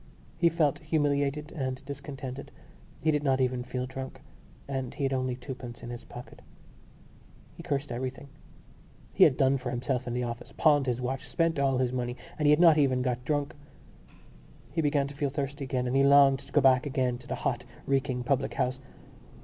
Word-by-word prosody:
He 170 0 +4
felt 155 -4 +1
humiliated 150 -1 0
and 130 -2 -4
discontented; 140 -1 -7 0.5
he 155 - +3
did 150 -1 +1
not 135 -2 +2
even 125 -1 0
feel 125 0 -3
drunk; 130 +1 -7 0.5
and 135 -2 -4
he 145 - -3
had 135 0 +1
only 130 -1 -1
twopence 125 -2 -8
in 120 - -6
his 120 0 -7
pocket. 120 +1 -11 1.1
He - - -9
cursed 140 -2 -2
everything. 130 +3 -4 0.9
He - - +7
had 130 - +3
done 135 -1 +3
for 125 - -4
himself 125 +1 -2
in 120 - -2
the 125 - -1
office, 120 -1 -6
pawned 145 -3 +4
his 125 -1 0
watch, 130 +1 -3
spent 165 -3 +1
all 135 -2 +2
his 125 -1 0
money; 125 -1 -2 0.2
and 150 - +2
he - - +6
had 150 +1 +5
not 165 -3 +7
even 130 -3 +2
got 125 -1 -1
drunk. 145 0 -1 1.2
He 165 - 0
began 145 -2 +2
to 140 - -7
feel 140 0 -1
thirsty 140 0 -3
again 130 -1 -1
and 125 +1 -1
he 135 - +5
longed 140 -1 +6
to 140 - -14
be - - +4
back 130 +1 +4
again 130 -3 0
in 125 - -15
the - - -2
hot - - -2 0.2
reeking 135 -2 0
public 135 +1 0
house. 130 +1 0
135 Hz, 195 wpm, -29 LUFS, 125-145 Hz, 1.2 s, He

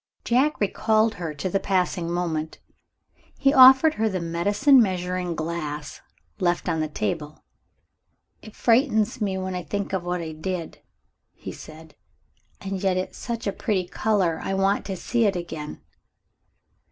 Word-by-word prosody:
Jack 265 +6 +2
recalled 220 +2 +2
her 165 -2 -3
to 150 +4 -4
the 195 +2 0
passing 180 -3 0
moment. 165 -3 -2 0.8
He 275 0 +3
offered 265 +3 +8
her 220 -3 0
the 190 -2 -2
medicine 205 - +3
measuring 180 -3 -1
glass 155 -2 -5 0.4
left 175 -2 0
on 160 - 0
the 155 - 0
table. 155 0 -4 1.0
"It 215 - -13
frightens 230 -2 +2
me, 195 -2 -1
when 185 0 -4
I 180 - -3
think 200 +3 -4
of 190 -2 -1
what 175 0 -2
I 160 -1 -5
did," 165 +2 -5 0.5
he - - -8
said. 160 0 -12 0.7
"And 195 -1 -5
yet 190 -2 +1
it's 185 - -4
such 235 -1 -4
a 200 - 0
pretty 195 -6 -1
color 185 -4 0
I 195 - -2
want 195 +1 +1
to 190 -2 -4
see 235 +5 0
it 200 -2 +2
again." 160 - -6
185 Hz, 155 wpm, -24 LUFS, 170-215 Hz, 1.0 s, offered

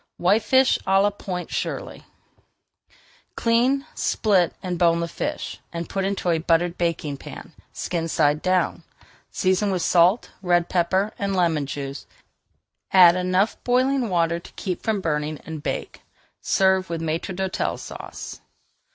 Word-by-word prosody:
WHITEFISH 220 +8 +3
À 195 0 +4
LA 205 - +3
POINT 180 -3 -6
SHIRLEY - - -4 1.3
Clean, 250 +4 +2
split, 190 -6 +1
and 180 -2 -3
bone 170 -1 +4
the 170 - -1
fish, - - -4
and 170 0 -5
put 195 - -2
into 195 -2 0
a 165 - +1
buttered 170 +1 +1
baking 165 -5 -2
pan, - - -10 0.2
skin 165 -2 -3
side 150 -2 +2
down. 185 0 +1 0.5
Season 190 +2 +1
with 185 -3 -1
salt, 180 +6 +3
red 175 -2 +2
pepper, 190 +4 +1
and 200 -1 -1
lemon 165 -6 +1
juice, 140 0 -6 0.8
add 180 -2 +8
enough 185 +3 0
boiling 255 0 +2
water 170 -2 +1
to - - -14
keep 185 -3 -4
from 215 -3 -1
burning, 150 -2 -1
and 160 -2 -6
bake. - - -4 0.4
Serve 190 -1 +2
with 165 -1 -3
Maître 165 +3 -3
d'Hôtel 190 0 -2
Sauce. - - -8
180 Hz, 140 wpm, -23 LUFS, 170-195 Hz, 1.3 s, add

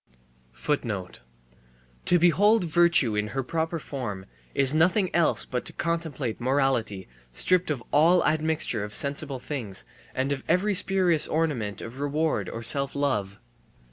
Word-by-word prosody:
To 175 - +4
behold 200 +5 +4
virtue 170 -8 +3
in 105 0 -1
her 135 - 0
proper 165 +4 -2
form 120 -11 -6 0.3
is 135 0 +5
nothing 180 +4 +2
else 170 -2 +3
but 125 -1 -3
to - - -7
contemplate 160 -9 -3
morality 125 -7 0 0.2
stripped 180 - +1
of 135 -6 -2
all 170 +4 +4
admixture 155 -7 0
of 105 0 -2
sensible 140 -1 -2
things 115 - -5 0.3
and 130 +2 -1
of 135 -2 -3
every 205 +3 +2
spurious 185 -4 +3
ornament 130 -11 -2
of 120 +4 -9
reward 150 +3 -1
or 115 - -7
self 140 +4 +2
love. 105 -9 -1
145 Hz, 135 wpm, -26 LUFS, 125-170 Hz, 0.3 s, is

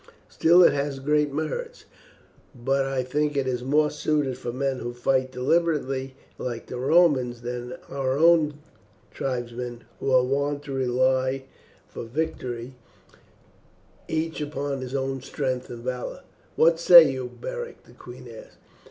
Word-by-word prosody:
Still 175 +3 +5
it - - +6
has 140 -1 -2
great 150 +2 +1
merits; 465 - -4 0.7
but 135 +3 0
I 135 -1 -1
think 145 +3 -1
it 130 -3 -1
more 150 +4 +2
suited 150 -3 0
for 125 -1 -5
men 135 +1 -2
who 120 - -5
fight 130 +1 0
deliberately, 135 -1 0 0.2
like 120 -2 -4
the 125 - -6
Romans, 130 -5 +3
than 125 0 -5
for - - -8
our 135 0 0
own 160 -2 +4 0.6
tribesmen, 120 -2 -4 0.2
who - - -2
are 130 -1 +5
wont 140 +2 -1
to 140 - -8
rely 130 +1 +1 0.4
for - - -8
victory 125 -2 -4 1.3
each 160 0 -2
upon 145 -2 -3
his 130 +1 -5
own 135 -1 -2
strength 130 -1 -3
and 120 -1 -8
valour." 125 0 -4 0.3
"What 165 +1 +4
say 170 -2 +9
you, 130 -2 -4
Beric?" 485 -1 -6
the - - -19
queen - - -12
asked. - - -12
135 Hz, 145 wpm, -25 LUFS, 125-150 Hz, 1.3 s, say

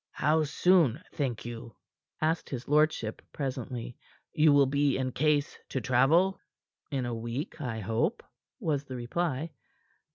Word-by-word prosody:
"How 155 +2 +2
soon, 155 -3 +3
think 130 -8 -2
you," 115 -2 -7 0.5
asked 160 +1 0
his 125 -2 -5
lordship 150 -7 +2
presently, 130 -3 -4 0.4
"you 155 -1 +5
will 140 -1 +6
be 140 0 +2
in 130 -1 -1
case 145 +1 +1
to 130 - -1
travel?" 140 - +3 0.5
"In 135 -4 -1
a 120 - -2
week, 120 - -4
I 115 -5 -3
hope," 115 - 0 0.4
was 150 - -1
the 130 - -7
reply. 150 +5 -2
140 Hz, 135 wpm, -29 LUFS, 120-155 Hz, 0.5 s, will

